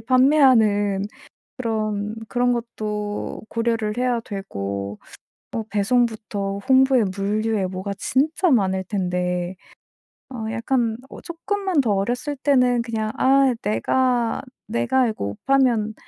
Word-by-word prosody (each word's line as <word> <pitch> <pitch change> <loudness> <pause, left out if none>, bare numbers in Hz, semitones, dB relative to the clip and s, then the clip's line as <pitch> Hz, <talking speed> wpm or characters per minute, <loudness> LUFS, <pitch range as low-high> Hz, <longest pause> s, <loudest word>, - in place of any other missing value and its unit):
판매하는 225 -6 +4 0.5
그런 215 -3 -2
그런 245 +1 +1
것도 210 -3 -4
고려를 230 -2 -1
해야 250 -1 +1
되고 100 - -5 0.5
뭐 225 - -3
배송부터 210 -2 0
홍보에 265 -2 +5
물류에 210 0 0
뭐가 185 +2 -4
진짜 310 - +1
많을 190 -6 +2
텐데 180 -2 -2 0.7
어 240 -4 -5
약간 230 -1 0
어 - - -10
쪼끔만 375 +1 -2
더 240 -6 +2
어렸을 245 +9 -1
때는 250 -3 +3
그냥 220 -2 -2
'아 270 0 +4
내가 240 - +1 0.3
내가 245 +3 +1
이거 215 - -3
옷 100 0 -5
팔면 245 -6 +2
225 Hz, 230 characters per minute, -22 LUFS, 200-255 Hz, 0.7 s, 홍보에